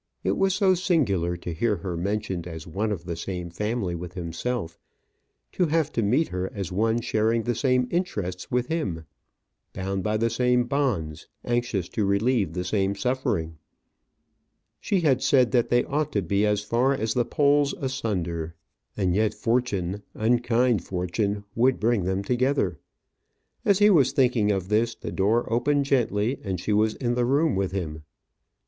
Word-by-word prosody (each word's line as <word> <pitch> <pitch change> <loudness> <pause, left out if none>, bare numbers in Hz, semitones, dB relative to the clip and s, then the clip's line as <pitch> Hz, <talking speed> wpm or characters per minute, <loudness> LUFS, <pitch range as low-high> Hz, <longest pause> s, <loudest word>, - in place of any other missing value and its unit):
It - - +1
was 195 -1 +2
so 190 -2 +4
singular 110 - +1
to 85 0 -6
hear 105 +6 +1
her 95 -3 -5
mentioned 95 -1 -2
as 80 -2 -7
one 100 +6 -2
of 90 -4 -4
the 85 -2 -3
same 90 0 -5
family 105 0 -2
with 90 +1 -7
himself; 85 +2 -4 0.7
to 180 - +1
have 155 -1 +1
to 115 - 0
meet 125 +10 +2
her 90 +1 -3
as 95 -4 -4
one 110 +5 +1
sharing 110 +1 +1
the 120 - 0
same 125 +1 +1
interests 105 - -2
with 125 0 0
him, 100 - -3 0.7
bound 95 +1 -3
by 110 +2 0
the 115 +1 0
same 125 +1 +2
bonds, 120 - -2 0.2
anxious 120 -7 -1
to 110 - -1
relieve 100 -2 +1
the 90 0 -2
same 95 +1 0
suffering. 100 - -2 1.2
She 195 -3 0
had 140 -6 +2
said 130 -4 +3
that 120 -3 +2
they 120 0 +3
ought 150 +1 -1
to 100 - +1
be 100 +4 +1
as 105 -1 +1
far 120 +6 +2
as 110 -4 -1
the 125 - +2
poles 145 +3 +2
asunder; 90 - -3 0.4
and 95 -4 +1
yet 105 +2 +1
fortune, 105 -5 -1
unkind 120 -2 +2
fortune, 100 +3 -2
would 125 +3 +2
bring 110 -4 +1
them 95 +1 -1
together! 125 - 0 0.8
As 200 - +4
he 210 +1 +6
was 140 -7 +4
thinking 125 -6 +3
of 95 -2 -2
this, 110 +2 +1
the - - -7
door 110 +5 +1
opened 140 +4 +2
gently, 120 -2 +1
and 95 -4 -3
she 105 - -1
was 110 +1 +2
in 120 -3 -1
the 120 0 +1
room 145 +4 +2
with 95 -1 -1
him. 80 -5 -4
110 Hz, 170 wpm, -25 LUFS, 95-125 Hz, 1.2 s, he